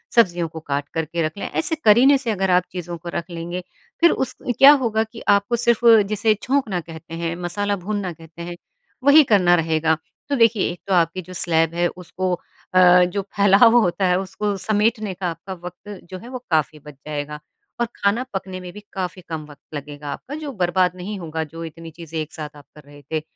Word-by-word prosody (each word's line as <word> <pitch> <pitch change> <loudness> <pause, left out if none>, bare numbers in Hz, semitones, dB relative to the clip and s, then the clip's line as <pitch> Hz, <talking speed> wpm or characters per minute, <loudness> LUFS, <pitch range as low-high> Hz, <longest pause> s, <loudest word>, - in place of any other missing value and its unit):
सब्जियों 175 -7 +3
को 160 0 -8
काट 145 -2 -3
कर 160 -1 -1
के 170 +2 -3
रख 155 +5 -5
लें, - - -4
ऐसे 320 0 -1
करने 255 +7 +7
से 245 -4 -2
अगर 190 -2 0
आप 180 0 +4
चीज़ों 175 -1 -5
को 170 +1 -8
रख 170 +2 -3
लेंगे, 175 +1 -5 0.4
फिर 340 - +7
उस 255 -1 -2 0.2
क्या 275 +1 +10
होगा 220 -1 +1
कि 225 +1 -11
आपको 200 +4 +3
सिर्फ़ 235 0 +1 0.3
जिसे 215 +1 +3
छौंकना 255 -9 0
कहते 165 0 -11
हैं, 170 0 -3
मसाला 205 +4 -1
भूनना 200 -4 -2
कहते 165 +1 -13
हैं, 175 0 -6 0.5
वही 290 +2 +8
करना 180 -3 +5
रहेगा। 160 -1 +1 0.3
तो 280 - +1
देखिए, 230 -4 +3
एक 175 - -9
तो 195 - +1
आपकी 170 +1 +2
जो 185 +1 -12
स्लैब 165 -2 +1
है, 175 0 +1
उसको 180 +1 -4 0.4
अ, 180 -1 +7
जो 180 +3 -1
फैलाव 205 +4 +6
होता 190 -1 +1
है, 180 0 +3
उसको 200 +2 -2
समेटने 215 +1 0
का 180 0 -4
आपका 190 +3 -8
वक़्त 180 +3 -9
जो 185 - -6
है 235 +5 -11
वो 255 - -5
काफ़ी 155 -1 +1
बच 150 0 -12
जाएगा, 150 0 -4 0.4
और 235 - +2
खाना 205 +5 +1
पकने 190 -1 -4
में 180 -1 -8
भी 210 - -9
काफ़ी 185 -1 -4
कम 155 -2 -4
वक़्त 145 +2 -14
लगेगा 145 0 -7
आपका 285 - -8
जो 290 - -5
बर्बाद 180 0 +2
नहीं 195 +3 -6
होगा 160 -2 -3
जो 165 +2 -8
इतनी 165 0 -10
चीज़ें 165 0 -7
एक 155 0 -5
साथ 150 -1 -7
आप 145 - -15
कर 150 - -13
रहे 145 0 -15
थे। 155 - 0
180 Hz, 210 wpm, -22 LUFS, 165-205 Hz, 0.5 s, क्या